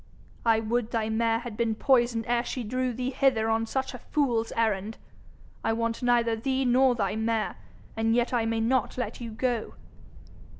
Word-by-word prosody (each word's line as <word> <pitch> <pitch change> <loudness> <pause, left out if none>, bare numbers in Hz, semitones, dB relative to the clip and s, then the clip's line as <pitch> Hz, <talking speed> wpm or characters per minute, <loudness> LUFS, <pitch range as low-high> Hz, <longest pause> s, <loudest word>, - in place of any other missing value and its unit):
'I 225 -1 +4
would 230 +1 -1
thy 220 -2 -1
mare 225 0 +1
had 235 -2 -7
been 225 -1 0
poisoned 240 -2 +2
ere 240 0 +1
she 250 0 -4
drew 255 +3 -1
thee 250 +2 -3
hither 230 -5 +2
on 225 0 0
such 265 +3 -2
a 250 - -7
fool's 235 -5 0
errand! 220 -1 0 0.7
I 225 - +1
want 230 +1 -2
neither 240 -2 +2
thee 265 +3 -1
nor 255 +1 +4
thy 205 -3 -1
mare, 220 0 -1 0.4
and 225 +1 +1
yet 240 +1 +1
I 230 -2 +1
may 225 0 0
not 250 +2 +1
let 240 -1 -4
you 235 - -5
go!' 230 +1 -2
230 Hz, 180 wpm, -27 LUFS, 225-250 Hz, 0.7 s, I